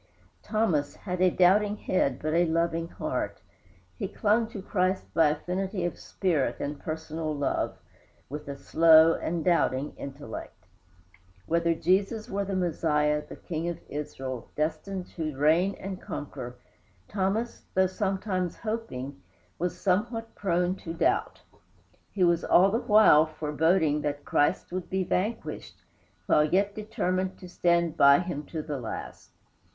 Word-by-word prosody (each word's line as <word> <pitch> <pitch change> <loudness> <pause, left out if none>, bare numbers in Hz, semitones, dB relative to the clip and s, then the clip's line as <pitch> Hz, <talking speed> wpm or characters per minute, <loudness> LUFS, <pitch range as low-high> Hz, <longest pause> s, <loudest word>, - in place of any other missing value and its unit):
Thomas 180 -10 0
had 180 -2 -4
a 185 - +6
doubting 200 +4 +3
head 140 -12 0
but 155 +1 -2
a 170 +1 +3
loving 165 0 0
heart; - - -3 0.6
he - - -1
clung 220 +2 +1
to 220 -2 -8
Christ 185 -1 0
by 165 -2 +5
affinity 180 +5 -2
of 175 - -3
spirit 165 -8 -1
and 145 0 -4
personal 155 0 -4
love, 140 -1 -1 0.5
with 150 +1 -7
a 140 -1 -5
slow 160 +2 +6
and 165 0 -3
doubting 150 -5 +1
intellect. 135 -9 -8 0.8
Whether 170 0 +1
Jesus 195 +6 0
were 200 +1 0
the 195 0 -3
Messiah, 150 -4 +1
the - - -7
King 165 0 -4
of 170 - -4
Israel, 135 -4 -5
destined 165 +5 -2
to 155 -4 -3
reign 165 +7 +3
and 190 -1 -7
conquer, 130 -4 -6 0.5
Thomas, 205 +4 -2
though 190 0 +5
sometimes 190 -1 -2
hoping, 145 - -5 0.4
was 175 +2 -2
somewhat 225 +4 0
prone 180 -2 0
to 165 -2 -7
doubt. - - 0 0.7
He 190 - 0
was 170 -1 +3
all 190 +3 +5
the 225 - +1
while 210 -9 +6
foreboding 155 0 +1
that 145 -1 -3
Christ 145 - +1
would 185 0 -4
be 190 0 0
vanquished, 210 +6 -3 0.4
while 150 - +4
yet 195 +6 +1
determined 190 -3 -2
to 180 - -11
stand 170 -2 +1
by 140 0 +7
him 175 -4 -3
to 160 -2 -4
the 150 -3 -4
last. 115 - -7
170 Hz, 140 wpm, -28 LUFS, 150-190 Hz, 0.8 s, by